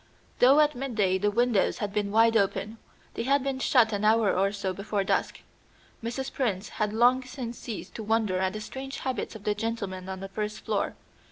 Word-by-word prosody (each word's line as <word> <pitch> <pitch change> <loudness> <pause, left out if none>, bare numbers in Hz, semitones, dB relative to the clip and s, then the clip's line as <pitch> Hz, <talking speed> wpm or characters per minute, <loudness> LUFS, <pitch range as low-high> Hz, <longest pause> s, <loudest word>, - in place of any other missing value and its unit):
Though 265 +4 +7
at 300 0 +3
midday 220 -8 0
the 205 +2 +2
windows 230 -1 +2
had 205 -1 -3
been 210 -1 0
wide 225 +1 +4
open, 215 +1 0 0.3
they - - -3
had 275 +3 +2
been 270 -1 -2
shut 240 -4 +4
an 205 0 -2
hour 220 -1 +4
or 195 +1 +2
so 200 -2 -3
before 200 +1 -2
dusk. - - -1 0.6
Mrs. 255 +3 -4
Prince 215 -7 -1
had 210 -1 -2
long 245 +4 +4
since 250 -2 -7
ceased 205 -5 -7
to 220 - -6
wonder 215 -3 +1
at 190 0 0
the 215 - -5
strange 270 +5 -6
habits 255 -4 -3
of 215 - -10
the 210 - +1
gentlemen 205 -4 -4
on 190 0 -5
the 195 0 -7
first 210 +1 -4
floor. - - -1
220 Hz, 200 wpm, -27 LUFS, 200-245 Hz, 0.6 s, Though